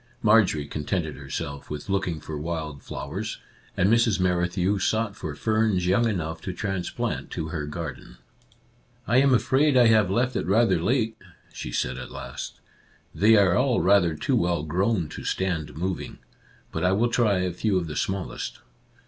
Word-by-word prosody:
Marjorie 105 -9 +4
contented 75 +1 -3
herself 70 +1 -6
with 75 -1 -6
looking 95 -5 -1
for 80 - -7
wild 75 -2 -4
flowers, - - -5 0.4
and 95 - +3
Mrs. 115 -2 +3
Merrithew 90 +2 +1
sought 110 +1 0
for 75 -2 -6
ferns 110 -2 +1
young 100 +6 +3
enough 80 -5 -3
to 95 - -4
transplant 95 -1 -3
to 80 - -4
her 75 -3 -4
garden. 75 -6 -7 0.5
" - - -35
I 120 +6 +3
am 135 +1 +5
afraid 130 +3 +3
I 125 - +7
have 110 -4 +4
left 120 +5 +1
it 85 - -1
rather 115 +5 +3
late," 115 -3 0 0.4
she - - -6
said 65 +1 -2
at 65 - -7
last. - - -7 0.3
" - - -34
They 110 +2 +7
are 95 -4 +4
all 125 -1 +2
rather 90 -4 +4
too - - 0
well 85 -3 +1
grown 90 +3 0
to - - -8
stand 80 -7 -2
moving. 90 +2 -3 0.5
But - - -3
I 90 +1 +3
will 115 +5 +2
try 115 -5 +2
a 90 -1 -1
few 100 +2 0
of 90 - -1
the 75 -2 -6
smallest. 95 +3 -3
95 Hz, 175 wpm, -25 LUFS, 80-110 Hz, 0.5 s, I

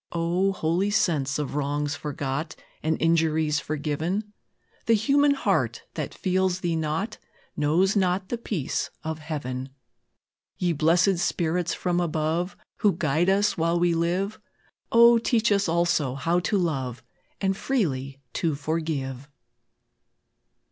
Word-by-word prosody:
O, 175 +3 +1
holy 180 +2 0
sense 150 -10 +1
of 150 -2 -3
wrongs 145 0 -1
forgot, 145 +1 -4 0.3
And 160 +1 0
injuries 160 -2 +2
forgiven! 155 +8 -3 0.5
The 230 - +5
human 280 +6 +3
heart - - 0
that - - -4
feels 185 0 0
thee 170 -2 0
not, 160 +7 -2 0.4
Knows 170 +7 +2
not 185 -1 +1
the 240 - -1
peace 185 - -2
of 160 0 -4
Heaven. 135 -4 -4 0.9
Ye 175 -2 +1
blesséd 170 +4 +3
spirits 175 0 0
from 175 -1 0
above, 165 +2 -1 0.2
Who 205 -2 +3
guide 160 +4 +1
us 200 -1 +2
while 165 +1 +2
we 175 0 +3
live, 180 +5 -1 0.5
O, 235 0 +7
teach 230 -1 +1
us 200 -3 +2
also 165 -6 +1
how 165 +6 +1
to 205 +4 0
love, 130 -8 -2 0.4
And 195 -1 +1
freely 140 - -2
to 160 -3 0
forgive. 145 -3 -3
165 Hz, 125 wpm, -26 LUFS, 150-190 Hz, 0.9 s, O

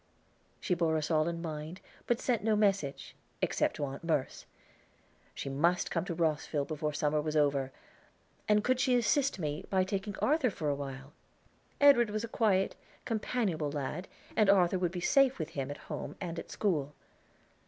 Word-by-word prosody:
She 185 - 0
bore 165 -2 +1
us 155 +1 -2
all 155 0 +3
in 170 0 -3
mind 155 +2 -5 0.3
but 240 -1 +2
sent 240 -5 0
no 220 0 +3
message, 195 -9 0 0.2
except - - +1
to 145 - -2
Aunt 135 +2 -7
Merce; 155 -5 -1 0.9
she - - -5
must 165 +6 +1
come 165 0 -1
to 170 - -4
Rosville 155 -3 0
before 150 0 -2
summer 150 0 0
was 155 0 -3
over. 140 -3 +2 0.8
And 210 0 +4
could 255 +2 +2
she 260 -1 +3
assist 250 +3 +2
me 150 -4 -3
by 190 -1 +3
taking 195 +1 -3
Arthur 295 -3 +2
for 155 -7 -3
a 145 - +1
while? 135 0 -7 0.7
Edward 275 -6 +6
was 215 +1 -2
a - - -3
quiet, 205 -4 +1 0.3
companionable 210 -9 -1
lad, 150 +5 -4 0.3
and 215 -2 +4
Arthur 185 -2 +4
would 175 -2 0
be 180 -1 -5
safe 275 +6 +4
with 160 -2 -4
him 140 -4 -4
at 145 - -5
home - - -5
and 170 -3 -4
at - - -9
school. 150 -8 -1
170 Hz, 175 wpm, -31 LUFS, 150-210 Hz, 0.9 s, Edward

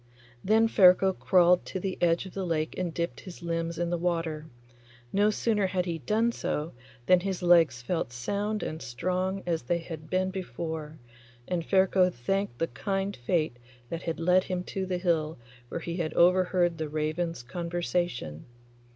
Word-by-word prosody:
Then 220 +3 +4
Ferko 190 -2 +6
crawled 180 -1 +4
to 190 - -4
the 190 0 -3
edge 170 +1 +2
of 190 - -10
the 195 - -3
lake 160 -3 -1
and 180 -2 -2
dipped 170 +1 -3
his 175 -2 -11
limbs 165 0 -2
in 170 0 -1
the 175 - 0
water. 165 -3 -1 0.7
No 205 +2 +4
sooner 210 -2 +1
had 185 -1 -1
he 170 -2 -3
done 220 - +1
so 155 -8 -3 0.3
than 185 -1 +6
his 190 0 -3
legs 165 -8 +4
felt 165 +6 -1
as 125 - -13
sound 205 - -2
and 160 +1 -4
strong 185 +9 -2
as 170 -2 0
they 170 +8 0
had 160 -2 -8
been 185 0 +1
before, 160 -2 -5 0.5
and 175 -2 -1
Ferko 190 0 +4
thanked 185 +2 -2
the 165 - +1
kind 195 +8 -2
fate 155 +1 -1 0.3
that 165 0 -4
had 165 -1 -3
led 180 +2 +3
him 180 -1 -2
to 190 +1 -4
the 180 -1 -1
hill 165 -3 0 0.3
where 170 - -4
he 170 +1 -4
had 160 -3 -2
overheard 180 -1 +3
the 155 -1 -2
ravens' 155 -1 -2
conversation. 170 - -3
175 Hz, 175 wpm, -28 LUFS, 160-185 Hz, 0.7 s, Ferko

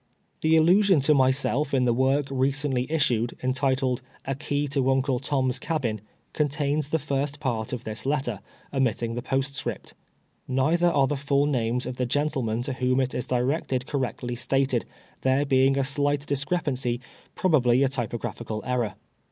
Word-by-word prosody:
The 160 +1 +4
allusion 185 +2 +5
to 150 +3 +4
myself 135 +1 +2
in 130 -1 +2
tlic 120 -1 +2
work 135 +2 +2
recently 135 0 0
issued, 125 -7 +1
entitled 130 -1 +1
" - - -30
A 135 - -1
Key 145 +1 -2
to 135 -1 +1
Uncle 135 -1 +1
Tom's 130 -2 0
Cabin," 120 - -2 0.3
contains 145 0 0
the 160 - +2
first 140 -1 -2
part 115 -6 -2
of 125 -2 -4
this 110 0 -4
letter, 130 -7 -1 0.3
omitting 120 -3 0
the 120 - -3
postscript. 135 +2 -3 0.5
Nei 135 +5 +2
ther 175 0 +3
are 140 -5 +3
the 145 - -1
full 140 +1 +1
names 125 -3 0
of 125 - -5
the 125 - -1
gentlemen 125 -4 -1
to 130 - -3
whom 130 0 +1
it 130 -1 0
is 125 - -3
directed 130 0 0
correctly 125 -3 -3
stated, 130 0 0 0.4
there 130 +2 +2
lacing 135 0 +3
a 135 - +2
slight 145 +1 +1
dis 140 -1 -1
crepancy, 135 -7 -1 0.4
i)ri>l)al)ly 135 -7 +3
a - - +3
typograpliical 115 -3 -4
err^r. 120 -6 -1
135 Hz, 165 wpm, -26 LUFS, 125-145 Hz, 0.5 s, allusion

